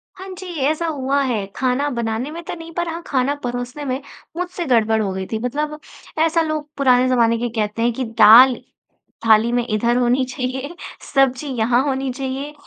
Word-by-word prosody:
हाँ 380 +1 -10
जी, 375 - -8 0.2
ऐसा 315 +2 -1
हुआ 280 -2 0
है। 230 -7 -1
खाना 265 +2 0
बनाने 235 +1 -3
में 335 +2 -7
तो - - -6
नहीं, 330 0 -10
पर 345 +1 -2
हाँ 335 +1 -5
खाना 270 +1 0
परोसने 245 +4 -4
में 260 0 -2 0.4
मुझसे 360 0 -4
गड़बड़ 225 -4 +2
हो 200 -2 -1
गई 190 0 -4
थी। 220 - -1
मतलब 300 +6 -3 0.5
ऐसा 330 +1 +2
लोग 310 -2 -3
पुराने 255 -2 +4
ज़माने 230 -2 +3
के 240 +1 -2
कहते 210 +1 -2
हैं 240 +1 +2
कि 260 - -3 0.2
दाल 240 +5 +9 0.7
थाली 225 +1 +5
ना 245 0 +1
इधर 235 +3 +1
होनी 250 +1 +2
चाहिए 260 +4 -5 0.4
सब्ज़ी 270 0 +2
यहाँ 235 +2 +2
होनी 270 -1 -1
चाहिए 270 +2 -5
255 Hz, 185 wpm, -20 LUFS, 235-295 Hz, 0.7 s, दाल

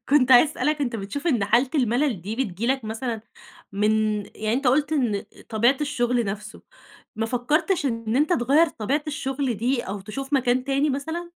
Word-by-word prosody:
كنت 265 -2 +4
عايزة 265 +4 +7
أسألك 300 -1 -1
أنت 240 -5 -1
بتشوف 215 - -5
إن 240 -11 +2
حالة 245 +6 +2
الملل 245 - +1
دي، 210 +5 -5
بتيجي 230 -4 -2
لك 265 -2 0
مثلًا 225 +1 -4 0.5
من 210 +2 +1 0.4
يعني 215 0 -3
أنت 270 +1 -1
قُلت 290 +4 +2
إن 235 -9 0 0.2
طبيعة 235 +5 +3
الشغل 250 -5 0
نفسه، 210 +2 -6 0.5
ما 225 0 -1
فكّرتش 290 +8 0
إن 230 -2 -2
أنت 300 +5 +2
تغيّر 290 +5 +3
طبيعة 270 +5 -2
الشغل 270 -4 -2
دي 240 +3 0
أو 195 +1 -5
تشوف 270 +8 -7
مكان 255 -2 +2
تاني 275 +2 +1
مثلًا؟ 320 +6 -4
250 Hz, 175 wpm, -24 LUFS, 225-285 Hz, 0.5 s, عايزة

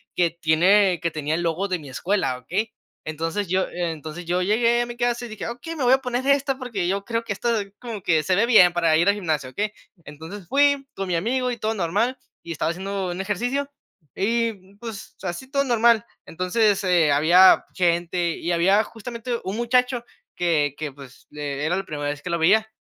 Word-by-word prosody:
que 170 -2 +2
tiene 175 +3 +3
que 170 0 -2
tenía 155 0 -2
el 175 - -2
logo 170 +4 -1
de 185 -2 -1
mi 150 -4 -11
escuela, 135 -2 -1
¿okey? 190 - -3 0.3
Entonces, 165 +5 -3
yo 185 +1 +1
entonces 165 -1 -5
yo 175 +2 0
llegué 230 +5 +2
a - - 0
mi 240 0 -8
casa 240 0 -1
y - - -7
dije: 215 -2 -7
"Okey, 285 +8 -7
me 290 - -3
voy 245 - +4
a - - +6
poner 250 -1 -3
esta 275 -1 +2
porque 230 -9 -3
yo 195 +2 -1
creo 230 +2 -2
que 205 - -2
esta 235 +3 0
ahí 200 -1 -6
como 230 -5 -6
que 160 -3 +2
se 185 - +1
ve 205 +5 +3
bien 215 -7 +7
para 170 -2 +2
ir 170 +5 +3
al 200 - +3
gimnasio, 155 -9 -2
¿okey?". 210 +9 -3 0.3
Entonces, 165 +6 -10
fui 285 +1 +3
con 195 0 -4
mi 175 - +1
amigo 250 +7 0
y 240 - -4
todo 220 0 -1
normal, 210 +7 0 0.3
y 170 - -5
estaba 160 +1 -1
haciendo 190 +1 -3
un 175 - -6
ejercicio, 245 +9 -2 0.5
y 210 -3 -1
pues, 220 0 -9
así 190 +9 -5
todo 280 0 +1
normal. 235 -2 +3 0.2
Entonces, 195 +4 +1
eh, 175 -5 +3
había 170 +6 +6
gente 175 -1 0
y 175 - -2
había, 190 +5 +4
justamente 235 +2 -6
un 195 +3 -4
muchacho, 245 0 +1 0.3
que 155 -5 +1
que, 150 -3 -5
pues, 135 -2 -14
eh, 145 -1 -4
era 165 +3 +1
la 195 - -2
primera 145 -4 -4
vez 145 0 -5
que 180 - -6
lo 170 0 -1
veía, 220 +7 +3
195 Hz, 210 wpm, -23 LUFS, 170-235 Hz, 0.5 s, bien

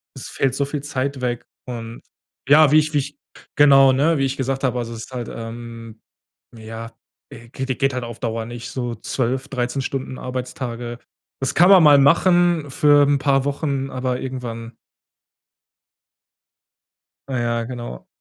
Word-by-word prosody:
es - - -8
fällt 135 -2 0
so 140 +2 0
viel 145 0 -5
Zeit 140 -1 -3
weg. 120 -1 -2 0.2
Und 115 -2 -7 0.5
ja, 150 0 +6
wie 155 - +6
ich 155 0 -1
wie 145 - +3
ich, 145 +1 -6 0.4
genau, 135 -2 +6
ne? 155 +5 +2
Wie 135 - +1
ich 135 0 -3
gesagt 135 0 -2
habe, 125 -2 0
also, 115 -1 -4
es 110 0 -7
ist - - -19
halt, 120 -2 -5
ähm, 115 -1 -9 0.6
ja, 115 +1 -8 0.4
geht 130 +2 -6
geht 135 -1 +1
halt 125 - -3
auf 115 -1 -9
Dauer 115 -2 -3
nicht 120 0 -8
so 120 -2 -3
12, 130 +4 -2
13 125 +1 -2
Stunden 130 -1 -4
Arbeitstage. 120 -1 -5 0.4
Das 135 - -1
kann 175 +3 +6
man 190 -3 +8
mal 145 -2 +8
machen 170 +1 +3
für 145 0 +5
'n 145 - +3
paar 135 -1 +2
Wochen, 140 -1 -2
aber 130 -1 -2
irgendwann 120 -3 -6 2.5
Ja, 130 -2 -2
ja, 115 -1 -1
genau. 120 - -8
130 Hz, 160 wpm, -21 LUFS, 120-140 Hz, 2.5 s, man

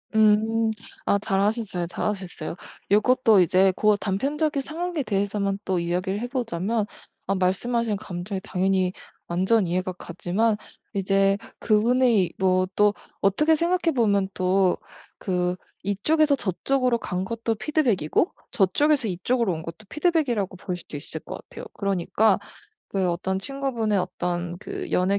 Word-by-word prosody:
음 220 +1 +4 0.3
아 200 - +3
잘 195 -1 0
하셨어요, 205 -5 0
잘하셨어요. 180 -3 -4 0.4
요것도 220 0 +5
이제 185 +2 +4
고 210 +1 +4
단편적인 275 +10 -1
상황에 330 +2 -3
대해서만 200 -2 -1
또 185 -2 +1
이야기를 180 +3 -1
해 245 - -2
보자면 225 -4 -1 0.4
어 195 - +1
말씀하신 210 +4 0
감정이 190 +1 -5
당연히 185 0 +1 0.3
완전 190 +4 +2
이해가 185 +2 -1
가지만 185 +5 -1 0.4
이제 195 0 +2 0.2
그분이 225 -2 +3
뭐 185 -1 +2
또 210 0 +4 0.3
어떻게 300 +12 +4
생각해 340 +1 +1
보면 200 -5 +2
또 185 0 +2 0.4
그 180 -1 0 0.3
이쪽에서 285 +10 +2
저쪽으로 250 +3 0
간 180 -4 -3
것도 230 +1 -2
피드백이고 255 - +1 0.2
저쪽에서 260 +7 +2
이쪽으로 210 +4 0
온 160 0 -5
것도 165 +6 -9
피드백이라고 280 - 0
볼 180 0 -4
수도 175 -3 -10
있을 145 - -6
것 - - -8 0.2
같아요. - - -9
그러니까 200 +1 +2 0.5
그 190 -2 0
어떤 190 +2 -1
친구분의 235 -3 -1
어떤 175 -1 -2
그 390 - -6
연애 190 +2 +2
200 Hz, 315 characters per minute, -25 LUFS, 185-235 Hz, 0.5 s, 요것도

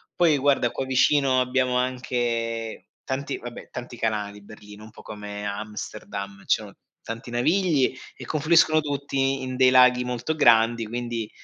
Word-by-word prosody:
Poi 160 -4 +4
guarda 135 -3 +2
qua 135 - -3
vicino 130 0 +3
abbiamo 125 0 0
anche 120 -3 -2 0.2
tanti 140 +1 -3
vabbè, 120 0 -9
tanti 120 -1 -8
canali: 105 -2 -2
Berlino, 105 0 -13
un 110 - -14
po' - - -14
come 105 -1 -7
Amsterdam, 100 -1 -6
ci - - +2
sono - - -11 0.3
tanti 115 +2 -7
navigli 155 +2 +2 0.2
e - - -10
confluiscono 155 +1 +3
tutti 135 -2 -1
in 130 0 -4
dei 130 -1 +6
laghi 125 -1 +6
molto 125 +5 -3
grandi, 115 -4 +4
quindi, 120 -1 -4
125 Hz, 145 wpm, -24 LUFS, 110-135 Hz, 0.3 s, dei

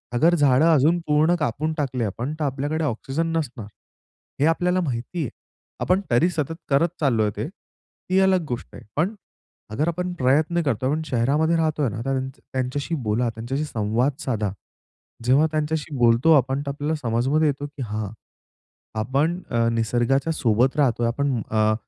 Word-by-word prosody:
अगर 165 +8 +4
झाडं 145 -2 +4
अजून 155 +4 +4
पूर्ण 155 +3 +3
कापून 150 +3 -1
टाकली 130 -5 -1
आपण, 120 +7 -3
तर 155 - -1
आपल्याकडे 145 +4 -2
ऑक्सिजन 140 +5 -2
नसणार. 125 -8 -4 0.7
हे 145 - +3
आपल्याला 180 +2 +2
माहिती 135 +3 -3
आहे. 140 - -2 0.5
आपण 185 +2 +2
तरी 120 +9 +4
सतत 160 -2 -2
करत 140 +5 +4
चाललोय 115 -8 +2
ते, - - -2 0.7
ही 190 - +4
अलग 190 -2 +3
गोष्ट 120 - -4
आहे. - - -11
पण 180 +9 0 0.6
अगर 150 +9 0
आपण 180 +1 -2
प्रयत्न 155 +4 +2
करतोय, 130 -3 0
आपण 155 +3 0
शहरामध्ये 150 +6 +1
राहतोय 155 -4 +1
ना 110 - -6
तर 135 - 0
त्यांच्या 130 0 -3
त्यांच्याशी 130 +5 -2
बोला, 115 +3 +1
त्यांच्याशी 120 +6 -3
संवाद 115 +2 0
साधा. 110 - -1 0.7
जेव्हा 135 +6 +4
त्यांच्याशी 155 -1 -2
बोलतो 120 +6 +4
आपण 135 +2 0
तर - - -3
आपल्याला 145 +3 -2
समजमध्ये 130 +6 +1
येतो 145 0 -2
की 145 -1 -10
हां, 105 -2 -3 0.9
आपण 145 +10 0 0.3
निसर्गाच्या 120 +6 +1
सोबत 125 -2 +2
राहतोय 120 -5 +2
आपण 130 0 0
अ, 110 0 +3
140 Hz, 155 wpm, -23 LUFS, 120-155 Hz, 0.9 s, अगर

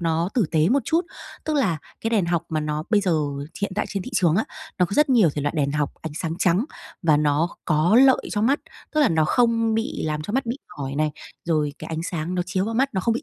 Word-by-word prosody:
nó 165 +1 0
tử 235 - +3
tế 160 +1 +3
một 270 +4 +4
chút. 330 +1 +2 0.4
Tức 310 -1 0
là 190 - +1 0.2
cái 225 - -1
đèn 205 -6 +2
học 170 -1 0
mà 155 -2 -1
nó 150 0 -2
bây 210 -2 +4
giờ 185 -4 +1 0.5
hiện 200 - -1
tại 210 - -1
trên 195 -2 -3
thị - - -8
trường 170 -1 +3
á, 220 - +2 0.3
nó 180 - +5
có 200 - -10
rất 300 0 +4
nhiều 215 - +5
thể 145 - -2
loại 145 - -1
đèn 140 -1 +1
học 150 -1 -1
ánh 160 -2 -5
sáng 165 0 -3
trắng 180 +5 +2 0.4
và 155 -4 +4
nó 150 +3 +2 0.2
có 160 +6 +3
lợi 265 -1 +6
cho 205 - 0
mắt, 275 +6 +2 0.3
tức 305 - +3
là 290 - +5
nó 160 -1 +2
không 230 +2 +2
bị 225 0 -2
làm 150 -1 -2
cho 205 - -5
mắt 260 +1 0
bị 235 +4 -3 0.2
mỏi 135 -1 -4
này, 150 +1 +1 0.3
rồi 155 -4 0
cái - - -8
ánh 160 0 -3
sáng 170 0 -3
nó 180 - +1
chiếu 185 +2 0
vào 225 +2 -3
mắt, 270 +1 +1
nó 190 - +1
không 230 +4 +1
bị 245 - -3
175 Hz, 270 wpm, -23 LUFS, 155-225 Hz, 0.5 s, lợi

